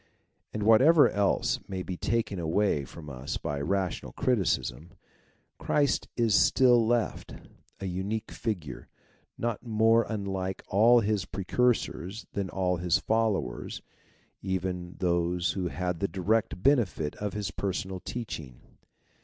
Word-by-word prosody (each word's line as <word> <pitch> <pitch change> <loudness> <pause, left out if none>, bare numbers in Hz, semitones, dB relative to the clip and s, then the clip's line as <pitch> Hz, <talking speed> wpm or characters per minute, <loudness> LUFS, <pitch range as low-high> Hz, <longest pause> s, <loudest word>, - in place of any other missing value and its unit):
And 105 - -3
whatever 135 +9 +7
else 100 -1 +1
may 95 -1 -4
be 90 - -5
taken 110 -1 -1
away 80 -3 +1
from 75 +3 -11
us 65 -1 -5
by 70 -1 -3
rational 95 +3 -2
criticism, 90 - -1 0.7
Christ 145 -2 +1
is 115 -3 +2
still 120 +3 +5
left; 120 -1 -1 0.4
a 95 - -5
unique 100 +5 -3
figure, 90 - -4 0.5
not 120 -2 -2
more 115 0 +3
unlike 95 -3 -3
all 115 +4 +5
his 105 -3 0
precursors 105 0 -1
than 100 -2 -2
all 90 -1 0
his 85 0 +2
followers, 105 - -1 0.6
even 90 -2 -3
those 85 0 +1
who 90 0 -2
had 90 -1 -3
the 100 - 0
direct 100 0 -1
benefit 110 - +2
of 105 -1 -3
his 105 -3 -3
personal 95 -1 -3
teaching. 80 - -6
95 Hz, 125 wpm, -28 LUFS, 90-110 Hz, 0.7 s, whatever